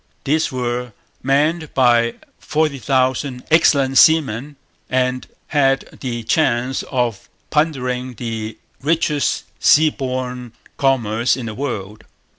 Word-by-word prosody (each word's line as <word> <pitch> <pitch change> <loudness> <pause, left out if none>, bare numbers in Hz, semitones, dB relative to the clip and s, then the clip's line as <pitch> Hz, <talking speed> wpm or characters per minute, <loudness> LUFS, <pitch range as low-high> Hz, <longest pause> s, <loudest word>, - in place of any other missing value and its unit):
These 155 +3 +1
were 125 -2 -3 0.3
manned 150 +4 0
by 120 -2 +3 0.2
forty 150 -3 -1
thousand 130 0 0
excellent 140 -5 +4
seamen 145 -3 +3 0.3
and 130 0 0 0.2
had 135 -2 +1
the 120 -3 -4
chance 125 0 +1
of 120 -6 -2 0.2
plundering 130 -5 -1
the 110 -1 -5 0.2
richest 150 -1 0 0.2
sea 155 +1 +5
borne 125 -3 -4 0.3
commerce 120 -3 +1
in 125 - -5
the 110 - -5
world. 105 -5 -5
130 Hz, 105 wpm, -19 LUFS, 120-145 Hz, 0.3 s, sea